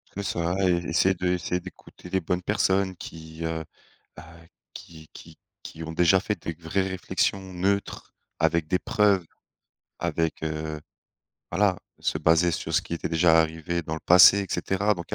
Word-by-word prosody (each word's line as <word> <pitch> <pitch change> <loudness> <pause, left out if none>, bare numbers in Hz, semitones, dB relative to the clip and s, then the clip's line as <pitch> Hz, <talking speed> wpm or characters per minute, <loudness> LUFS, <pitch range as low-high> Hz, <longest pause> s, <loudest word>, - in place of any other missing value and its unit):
C'est 100 - -4
ça 85 -2 -1
et - - +4 0.2
essayer 95 +3 +3
de 90 +1 -2
essayer 90 0 -1
d'écouter 90 0 -13
les 95 - +1
bonnes 90 +2 -2
personnes, 95 -1 +1
qui, 80 0 -9
heu 80 0 -3 0.5
bah, 85 - -11 0.5
qui 80 -2 -12
qui - - -14 0.2
qui 80 - -9
ont 80 0 -6
déjà 90 +3 +4
fait 105 -4 -3
des 85 - -3
vraies 85 +4 -2
réflexions 95 +1 -1
neutres 100 +3 -2 0.2
avec 80 0 +1
des 90 - +2
preuves. 100 -4 +2 0.8
Avec, 80 -1 -1
heu 80 -1 -4 0.7
voilà, 95 +1 +2 0.2
se 75 - -1
baser 80 +2 +3
sur 80 -1 -4
ce 85 - +3
qui - - -5
était 85 - -4
déjà 80 0 +5
arrivé 80 +2 -2
dans 80 - -4
le 80 - -6
passé, 90 +3 +8
et 100 - -4
cetera, 100 +2 0
donc 85 -3 -7
il - - -2
85 Hz, 175 wpm, -25 LUFS, 80-95 Hz, 0.8 s, passé